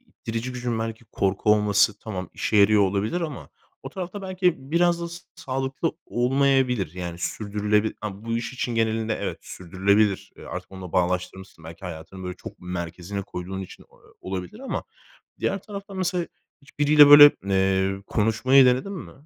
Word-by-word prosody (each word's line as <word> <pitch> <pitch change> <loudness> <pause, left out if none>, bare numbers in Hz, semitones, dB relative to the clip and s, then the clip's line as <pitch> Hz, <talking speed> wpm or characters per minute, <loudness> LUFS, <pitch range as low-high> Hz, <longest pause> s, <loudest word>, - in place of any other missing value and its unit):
ittirici 115 +3 -6
gücün 120 -2 -3
belki 115 +1 -5
korku 100 0 +1
olması 105 0 +3
tamam 95 -4 -6
işe 110 - -1
yarıyor 105 0 +6
olabilir 100 - 0
ama 140 - -5 0.3
o - - -6
tarafta 190 +2 -6
belki 180 -7 -1
biraz 175 0 +3
da 170 - -4
s 170 +1 -8 0.2
sağlıklı 135 +4 -3
olmayabilir. 125 - +1
Yani 85 -1 -6
sürdürülebilir 105 +2 -1
ama 105 0 -6
bu 115 0 -1
iş 120 +2 -4
için 120 -2 -3
genelinde 110 -1 0
evet - - -3
sürdürülebilir. 100 +3 0
Eee, - - -12
artık - - -7
onunla 95 -2 -9
bağlaştırmışsın 90 -1 -2
belki 85 +3 -11
hayatını 90 +2 -8
böyle 90 0 -5
çok - - -10
merkezine 90 +2 -5
koyduğun 95 +1 -6
için 95 - -10
o - - -24
o - - -26 0.2
olabilir 95 - -6
ama 270 - -4 0.6
diğer 195 -1 -1
tarafta 200 -1 -9
mesela 180 -2 -1 0.4
hiçbiriyle 145 +1 +5
böyle, 145 0 +11
eee, 95 0 +1
konuşmayı 125 +5 +4
denedin 130 +11 +1
mi? 185 - -8
110 Hz, 160 wpm, -24 LUFS, 95-135 Hz, 0.6 s, böyle